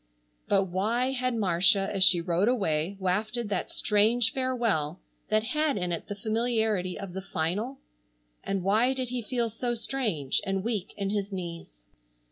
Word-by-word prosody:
But 195 -1 +4
why 215 +8 0
had 255 -2 -1
Marcia 195 -1 +3
as 195 -2 +2
she 180 -2 +6
rode 175 +3 +1
away 195 -6 0
wafted 210 +5 -1
that 205 - -2
strange 225 +2 +2
farewell 230 - 0 0.3
that 215 0 +3
had 300 +2 0
in 180 -2 -1
it 170 - -4
the 205 - -4
familiarity 220 -3 0
of 195 -3 -7
the 190 - -4
final? 195 +9 -2 0.7
And 195 -2 -2
why 225 +7 +3
did 255 -2 -2
he 250 0 -2
feel 235 +1 -1
so 240 +2 -2
strange 220 - -1
and 195 -1 -1
weak 215 -5 -3
in 200 -1 -1
his 205 -1 -2
knees? 170 - -7
205 Hz, 160 wpm, -28 LUFS, 185-240 Hz, 0.7 s, she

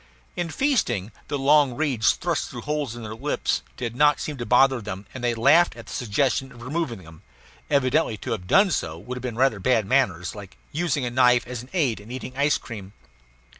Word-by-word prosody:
In 175 -1 -2
feasting, 140 - 0 0.2
the 145 - -2
long 140 -1 +4
reeds 135 -7 +2
thrust - - -2
through - - -7
holes 150 -5 -2
in 120 - -8
their 110 0 -6
lips 110 - -1 0.2
did 120 -2 -4
not 145 +1 +4
seem 150 - -4
to 120 - -5
bother 130 0 +4
them, 100 -1 -6
and 130 - -7
they 120 -1 +1
laughed 150 +10 +4
at - - -10
the - - -9
suggestion 130 +3 0
of 120 -1 -12
removing 130 - -3
them; 80 0 -14 0.5
evidently 140 -3 +2
to 125 - -6
have 95 -5 -3
done 195 - +5
so 80 - -2
would 120 +9 -7
have 125 - -6
been 125 -2 -4
rather 130 -5 +2
bad 115 0 +2
manners 95 -9 +1
like 100 -3 -11
using 160 -4 -1
a 120 - -3
knife 125 -1 +4
as 125 -2 -6
an 125 - -14
aid 140 - +1
in 105 +2 -14
eating 130 0 -7
ice 145 +2 +2
cream. 100 -4 -9
125 Hz, 210 wpm, -24 LUFS, 110-145 Hz, 0.5 s, done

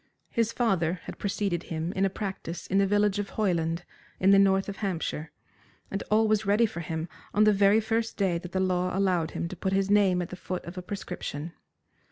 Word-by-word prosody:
His 230 -1 +1
father 185 -9 +1
had - - -8
preceded 200 -3 -1
him 165 +1 -3
in 195 0 +1
a - - +2
practice 190 -4 -5
in 195 - +1
the 200 - +3
village 205 0 +2
of 205 - -3
Hoyland, 170 -4 0 0.3
in 190 +1 +5
the 195 - +7
north 195 -1 +4
of 200 0 -5
Hampshire, 165 -5 -3 0.6
and 195 - -2
all 220 +1 +4
was 215 0 +2
ready 210 +3 +4
for 210 -5 -5
him 160 0 -3 0.3
on 210 - +5
the 215 0 +6
very 200 +2 +5
first 225 +1 -1
day 185 -4 +1
that 180 0 -9
the 190 - -1
law 185 0 0
allowed 180 -5 +2
him - - -1
to 185 - -7
put 190 +1 -2
his 195 0 +1
name 195 -3 +4
at 175 0 -3
the - - -6
foot 185 0 -5
of 170 - -8
a 180 - -4
prescription. 170 -4 -5
195 Hz, 220 wpm, -28 LUFS, 175-205 Hz, 0.6 s, the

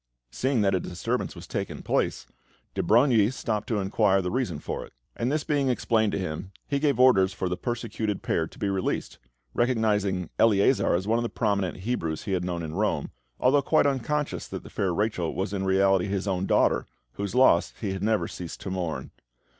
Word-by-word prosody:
Seeing 130 -3 0
that 100 -1 +2
a 95 - +2
disturbance 90 0 -3
was - - -9
taking - - -4
place, - - 0 0.5
de - - -1
Brogni 115 -2 +4
stopped 110 -5 -3
to 115 - 0
inquire 95 0 +2
the 90 -1 -2
reason 120 - -1
for - - -5
it; - - -14 0.2
and 120 +3 -1
this 150 0 0
being 140 -3 +1
explained 110 -3 +1
to - - 0
him, 95 0 -4 0.2
he 140 -1 0
gave 140 -3 +1
orders 100 -7 +5
for 95 - -2
the 90 - -1
persecuted 110 0 -3
pair - - 0
to - - -17
be 100 - -1
released, 95 -1 -2 0.3
recognising 105 -6 +1
Eleazar 100 -6 +4
as 95 +3 -2
one 115 +2 +2
of - - -1
the 120 - -2
prominent 100 -5 -1
Hebrews 85 -8 -2
he 105 - -4
had 90 -2 0
known 85 -2 -3
in 80 -1 -5
Rome, 95 -6 -1 0.3
although 140 +3 +4
quite 155 +3 +3
unconscious 145 +2 -1
that - - -6
the - - -12
fair 95 -2 0
Rachel 90 -3 -1
was 95 +1 -2
in 95 -1 -2
reality 95 0 +3
his 100 0 -2
own 95 -1 -1
daughter, - - +2 0.2
whose 100 - -4
loss 125 -10 +5
he 100 -4 -2
had 95 - -5
never 110 +1 +1
ceased 85 -2 -7
to 95 - -5
mourn. 85 -8 -3
100 Hz, 200 wpm, -26 LUFS, 95-120 Hz, 0.5 s, orders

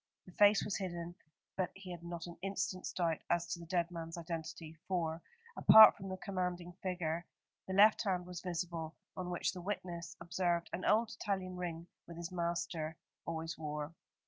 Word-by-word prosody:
The 180 - -13
face 205 +2 +5
was 205 - -1
hidden, 175 -3 -4 0.4
but 185 -2 0
he 195 -2 -9
had 175 -1 -7
not 170 -1 -5
an 175 -1 -8
instant's 185 -1 -2
doubt 165 -3 0
as 170 -1 +2
to - - -4
the 170 - -10
dead 175 -1 0
man's 165 -1 -6
identity, 165 -1 -5
for, 165 -3 -1 0.3
apart 220 0 +10
from 195 -1 -7
the 185 - -4
commanding 180 -2 -3
figure, 175 -2 -2 0.4
the 190 - -2
left 210 +2 +7
hand 185 -4 0
was 180 -1 -7
visible, 170 -2 -3 0.2
on 180 -1 -4
which 175 - 0
the 180 - -7
witness 175 -3 -4
observed 175 0 0
an 185 - -3
old 220 +1 +4
Italian 190 -3 -1
ring 170 -2 -4 0.2
that 170 - -9
his 170 +1 -5
master 170 -2 -2 0.3
always 165 0 -3
wore. 150 0 -4
175 Hz, 175 wpm, -35 LUFS, 170-185 Hz, 0.4 s, apart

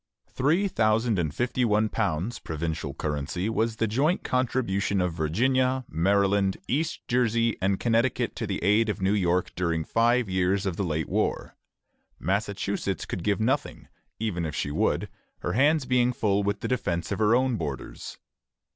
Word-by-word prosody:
Three 160 +10 +2
thousand 110 - +1
and 80 -4 0
fifty 125 - -1
one 110 -1 +3
pounds, 100 +1 -2
provincial 80 -2 -4
currency, 75 +6 -2
was 115 0 0
the 115 - 0
joint 140 - +1
contribution 115 -6 0
of 90 -2 0
Virginia, 130 - +1
Maryland, 100 +3 +2
East 155 +5 -2
Jersey, 115 -2 +2
and 95 0 +1
Connecticut 115 +1 +1
to - - -3
the - - -3
aid 105 +4 +3
of 105 - -2
New 95 +1 +1
York 90 -3 +1
during 85 -3 0
five 120 +4 +2
years 95 +2 +1
of 95 -3 -1
the 100 - -2
late 80 -3 -1
war. - - -1 0.6
Massachusetts 100 0 -2
could 85 - -5
give 105 0 +1
nothing, 115 +4 -1 0.3
even 105 -6 -2
if 80 -2 -3
she 75 - -2
would, - - 0 0.3
her - - -2
hands 145 +3 +3
being 125 -1 +2
full 105 -6 +1
with 100 0 -1
the - - -2
defence 90 -10 -2
of 100 - -2
her 110 +1 +4
own 130 -1 +2
borders. 75 - -6
105 Hz, 165 wpm, -26 LUFS, 90-120 Hz, 0.6 s, her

